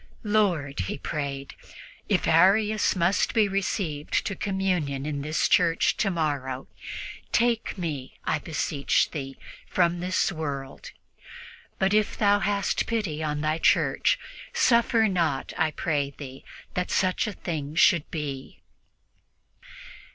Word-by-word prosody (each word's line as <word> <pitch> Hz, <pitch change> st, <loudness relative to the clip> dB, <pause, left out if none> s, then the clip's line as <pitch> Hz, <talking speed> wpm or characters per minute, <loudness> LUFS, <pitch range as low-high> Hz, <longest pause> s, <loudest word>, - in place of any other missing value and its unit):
"Lord," 185 Hz, -, +1 dB
he -, -, -3 dB
prayed, 140 Hz, -1 st, -4 dB, 0.6 s
"if -, -, +1 dB
Arius 205 Hz, +6 st, +4 dB
must 185 Hz, +5 st, +1 dB
be 220 Hz, -2 st, +4 dB
received 185 Hz, -6 st, -1 dB
to 200 Hz, -, -2 dB
communion 180 Hz, -8 st, -1 dB
in 145 Hz, -2 st, -3 dB
this 155 Hz, +2 st, 0 dB
church 170 Hz, -2 st, +3 dB
tomorrow, 145 Hz, -8 st, -1 dB, 0.7 s
take 235 Hz, -3 st, +1 dB
me, 150 Hz, -7 st, -5 dB
I 150 Hz, -, +1 dB
beseech 150 Hz, -2 st, 0 dB
Thee, 135 Hz, -3 st, -6 dB, 0.3 s
from 175 Hz, -1 st, +1 dB
this 185 Hz, +2 st, 0 dB
world. 140 Hz, -5 st, -5 dB, 0.9 s
But 190 Hz, +1 st, +1 dB
if 215 Hz, -1 st, +2 dB
Thou 205 Hz, -1 st, +4 dB
hast 200 Hz, 0 st, 0 dB
pity 205 Hz, -10 st, -2 dB
on 150 Hz, -1 st, -2 dB
Thy 155 Hz, +1 st, 0 dB
Church, -, -, +3 dB, 0.4 s
suffer 235 Hz, -, +4 dB
not, 165 Hz, -8 st, -1 dB
I 160 Hz, -3 st, +2 dB
pray 145 Hz, -2 st, -1 dB
Thee, 135 Hz, -2 st, -9 dB, 0.3 s
that 180 Hz, 0 st, -2 dB
such 185 Hz, +3 st, +1 dB
a 210 Hz, -, -3 dB
thing 155 Hz, -5 st, -5 dB
should 170 Hz, -2 st, +4 dB
be." 140 Hz, -4 st, -5 dB
165 Hz, 120 wpm, -26 LUFS, 145-195 Hz, 0.9 s, Arius